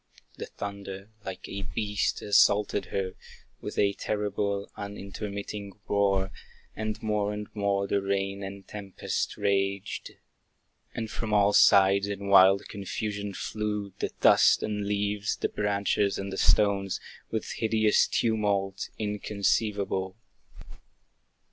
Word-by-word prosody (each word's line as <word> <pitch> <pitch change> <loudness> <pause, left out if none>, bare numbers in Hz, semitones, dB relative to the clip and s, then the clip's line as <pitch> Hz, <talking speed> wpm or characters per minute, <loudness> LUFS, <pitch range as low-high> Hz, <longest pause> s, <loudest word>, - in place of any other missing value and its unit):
The - - -5
thunder, 100 0 -7
like 95 -2 -7
a 100 - -5
beast, 105 +1 -1
assaulted 105 0 +4
her, 95 -1 -3 0.5
With - - -6 0.2
terrible, 100 -1 -2
unintermitting 100 0 -6
roar; 95 -2 +2 0.4
And 110 0 -3
more 105 -1 0
and 105 0 -5
more 100 -1 +1
the 100 0 0
rain 100 0 -1
and 95 0 -7
tempest 100 -2 -4
raged. 100 0 -1 0.8
And 115 -2 -4
from 110 -2 -2
all 100 0 +4
sides 100 0 +6
in 100 -1 -4
wild 95 0 +6
confusion 100 0 -4
flew 105 -2 -3
The - - -1
dust - - +6
and 105 -1 -2
leaves, 105 0 0
the - - -2
branches 100 -1 0
and 100 0 -4
the - - -4
stones, 100 -2 +3 0.3
With 110 -1 -3
hideous 110 -1 +3
tumult, 100 -4 0
inconceivable. 100 -2 -1
100 Hz, 115 wpm, -28 LUFS, 100-105 Hz, 0.8 s, sides